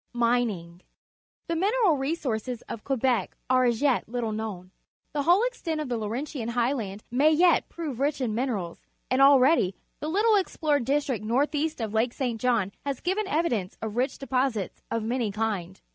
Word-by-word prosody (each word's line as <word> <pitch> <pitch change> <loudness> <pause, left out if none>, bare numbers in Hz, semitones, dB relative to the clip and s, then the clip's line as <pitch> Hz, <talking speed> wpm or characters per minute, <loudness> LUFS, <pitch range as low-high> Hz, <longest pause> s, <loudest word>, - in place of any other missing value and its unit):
Mining. 230 -8 0 0.3
— - - -58
The 335 - -1
mineral 400 0 +3
resources 255 -5 -2
of 215 - -7
Quebec 255 -6 0
are 255 0 +4
as 240 +1 +1
yet 270 -6 +2
little 235 -2 -2
known. 210 -4 -5 0.4
The 295 - 0
whole 350 +9 +4
extent 365 -11 -2
of 300 -4 -3
the 245 - 0
Laurentian 235 +3 -4
Highland 235 -4 -1
may 275 +5 +4
yet 335 +2 +4
prove 300 -8 -5
rich 285 +1 0
in 245 -5 -1
minerals, 215 -8 -2 0.3
and 260 +1 +3
already 275 - +5 0.2
the 305 - -3
httle 420 +4 +4
ex 380 - -5
plored 290 -5 +1
district 275 -5 0
north 255 +8 +1
east 310 +1 -1
of 220 -2 -3
Lake 230 +2 +1
St. 240 -5 -2
John 230 -6 +1
has 280 -2 -3
given 385 +3 -1
evidence 265 - -1
of 220 -1 -5
rich 255 +3 0
deposits 255 -6 -1
of 230 -1 -1
many 235 -1 -1
kinds. 195 -4 -3
250 Hz, 175 wpm, -27 LUFS, 220-295 Hz, 0.4 s, already